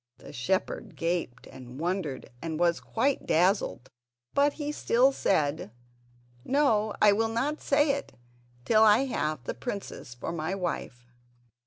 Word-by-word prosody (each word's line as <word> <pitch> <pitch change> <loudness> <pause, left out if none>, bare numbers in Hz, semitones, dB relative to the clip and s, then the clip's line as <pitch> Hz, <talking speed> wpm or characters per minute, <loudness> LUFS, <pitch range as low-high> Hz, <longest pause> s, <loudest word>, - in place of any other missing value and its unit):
'" - - -56
The 140 - -12
shepherd 185 - -2
gaped 165 -8 -2
and 130 0 -11
wondered 165 -6 -3
and 160 -2 -4
was 170 -1 +2
quite 265 +4 -1
dazzled, 175 - +1 0.4
but 285 +1 +3
he 295 -1 -4
still 260 -2 +3
said: 155 - 0 0.7
"No; 220 - +2
I 210 - +6
will 225 +2 +1
not 270 +7 -1
say 290 +1 +3
it 280 0 -4 0.5
till 220 -1 +4
I 220 +4 +6
have 155 - -2
the - - -3
princess 125 - -6
for 120 - -5
my 170 +3 -2
wife." 165 -9 -4
190 Hz, 145 wpm, -28 LUFS, 155-235 Hz, 0.7 s, I